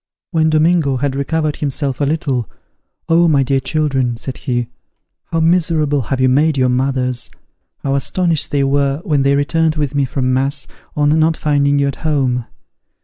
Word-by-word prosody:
When 160 -2 +2
Domingo 155 -3 +2
had 135 +1 -1
recovered 150 +2 -1
himself 140 -1 -2
a - - +3
little, 140 -6 -1 0.6
"Oh, 170 +1 +4
my 145 -4 +3
dear 135 +1 +1
children," 135 -5 -1
said 130 +2 -6
he, 120 -2 -2 0.6
"how 165 - -2
miserable 160 -4 +2
have 130 +3 -3
you 130 - +3
made 145 +3 +2
your 130 -1 +2
mothers! 125 -1 -1 0.5
How 135 - 0
astonished 160 +2 0
they 140 -1 +1
were 140 +1 0
when 150 -6 +1
they 140 +1 +3
returned 155 +2 +1
with 150 -3 -2
me 140 -1 +1
from 130 0 -1
mass, 135 +2 0 0.3
on 150 +1 +2
not 160 +1 +2
finding 145 -1 +1
you 140 0 +2
at 140 - -3
home. 130 -6 -1
140 Hz, 170 wpm, -17 LUFS, 135-155 Hz, 0.6 s, Oh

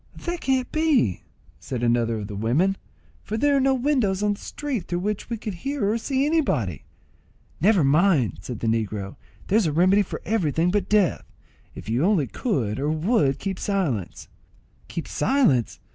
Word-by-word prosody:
"That 345 -1 -5
can't 260 -1 0
be," 310 - +2 0.4
said 125 -2 -5
another 115 -1 +1
of 105 - -5
the 105 - -7
women, 135 - +1 0.5
"for 215 - -4
there 285 +4 +3
are - - +2
no 265 0 +3
windows 245 -8 +1
on 210 0 +2
the 200 - -10
street 275 -10 -4
through 175 - -2
which 210 +2 -3
we 230 - -2
could 210 -1 -5
hear 270 +5 -2
or 220 +3 +1
see 265 +4 0
anybody." 150 - 0 0.7
"Never 195 0 +4
mind" 145 - +3
said 115 +3 -7
the - - -2
negro; 110 -3 -2 0.3
"there's 210 -2 +2
a - - 0
remedy 185 +6 +4
for 195 - -4
everything 175 -5 +1
but 200 -1 -1
death. 210 -5 +1 0.4
If - - -10
you 120 +6 0
only 185 -6 +3
could 125 - -2
or 145 +2 0
would 155 - +1
keep 190 +2 -4
silence—" 155 - -2 0.6
"Keep 170 - -5
silence! 235 - +1
190 Hz, 175 wpm, -24 LUFS, -, 0.7 s, Never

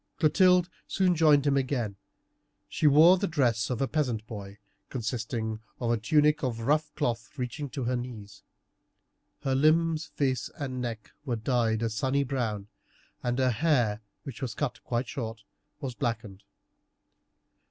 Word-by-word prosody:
Clotilde 180 +2 +4 0.2
soon 185 -2 +2
joined 150 -4 +5
him 140 -1 +3
again. 130 -6 -1 0.7
She 155 - +1
wore 160 +6 +7
the 200 - 0
dress 120 - +1
of 125 +1 -1
a - - +1
peasant 125 -8 -1
boy, 100 -3 -8 0.3
consisting 110 -2 -3 0.2
of 120 -2 0
a 120 - +2
tunic 150 +7 +3
of 120 -4 -2
rough 150 +5 +1
cloth 120 -2 -2
reaching 135 +3 -4
to 135 0 -4
her 125 +1 0
knees. 110 -5 -7 1.0
Her 135 - +1
limbs, 160 +3 +3
face, 130 -4 -1
and 130 -3 -4
neck 115 -3 -5
were 125 -5 -1
dyed 115 -1 +1
a 115 - +1
sunny 135 +4 +1
brown, 115 -7 -2 0.5
and 120 0 -1
her 130 -1 +3
hair, 120 -5 +1 0.2
which 135 -5 -8
was 125 -4 -3
cut 145 -4 -3
quite 120 +1 -1
short, 115 -3 -5 0.4
was 135 -3 -3
blackened. 110 -5 -3
125 Hz, 150 wpm, -28 LUFS, 115-150 Hz, 1.0 s, wore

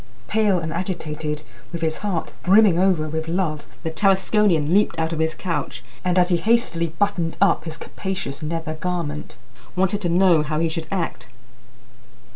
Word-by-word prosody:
Pale 210 -3 +2
and 160 0 -4
agitated, 155 -4 -3 0.3
with 170 -1 -4
his 160 -1 -1
heart 195 -6 -2
brimming 195 -2 +5
over 180 -5 +2
with 160 +1 -3
love, 165 -3 -1 0.2
the 160 - -2
Tarasconian 190 -2 +3
leaped 200 -4 +3
out 160 0 0
of 160 - -3
his 160 0 0
couch, 165 -5 -3 0.2
and, 180 0 +1
as 180 0 +4
he 175 - +3
hastily 170 -3 +2
buttoned 185 -5 0
up 200 -4 +3
his 160 -1 -5
capacious 185 -9 -5
nether 160 0 -3
garment, 155 -3 -4 0.4
wanted 190 +2 +1
to 175 - 0
know 175 -2 +5
how 155 0 -2
he 165 +1 +1
should 160 0 -4
act. 175 -8 -3
170 Hz, 165 wpm, -22 LUFS, 160-190 Hz, 0.4 s, brimming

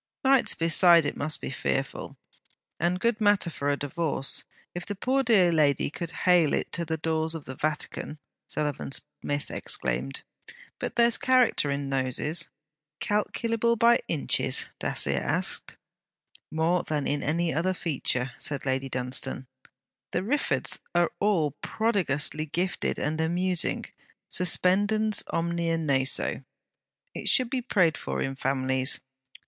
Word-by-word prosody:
'Nights 265 -1 +4
beside 165 0 +5
it 145 - -2
must 155 +2 +1
be - - -5
fearful, - - -3 0.6
and 175 +1 0
good 230 +1 0
matter 205 -4 +3
for 145 -2 -2
a 145 - +1
divorce, 145 -1 -1 0.3
if 175 - -5
the 205 - -5
poor 260 +7 +1
dear 210 -9 +4
lady 145 -3 +2
could 170 +1 -5 0.2
hale 175 -4 +4
it - - -3
to 170 - -2
the 160 -1 -3
doors 160 0 0
of 155 - -7
the 130 - -6
Vatican!' 155 +1 -3 0.3
Sullivan 150 -3 -3
Smith 145 +1 -3
exclaimed. 65 +2 -2 0.6
'But - - -4
there's 235 -1 +4
character 255 - +3
in 140 0 -2
noses.' 135 +4 0 0.5
'Calculable 230 +2 0
by 235 +1 +4
inches?' 155 -4 +1
Dacier - - +1
asked. - - +1 0.7
'More 160 +3 +1
than 150 -2 -3
in 145 0 -1
any 165 +2 0
other 185 +3 0
feature,' 135 -6 -2
said 140 -2 -2
Lady 135 0 -1
Dunstane. 130 +1 -2 0.7
'The 180 - 0
Riffords 280 +8 +1 0.2
are 175 -1 +3
all 185 -8 +2
prodigiously 165 -8 0
gifted 175 +5 -2
and 155 +2 -2
amusing: 175 +2 0 0.5
suspendens 205 +4 +2
omnia 170 0 -1
naso. 140 -4 0 0.7
It - - -1
should 255 -2 +2
be 260 -2 -1
prayed 180 - +1
for - - -4
in 135 0 -2
families.' 130 0 0
165 Hz, 135 wpm, -27 LUFS, 145-195 Hz, 0.7 s, beside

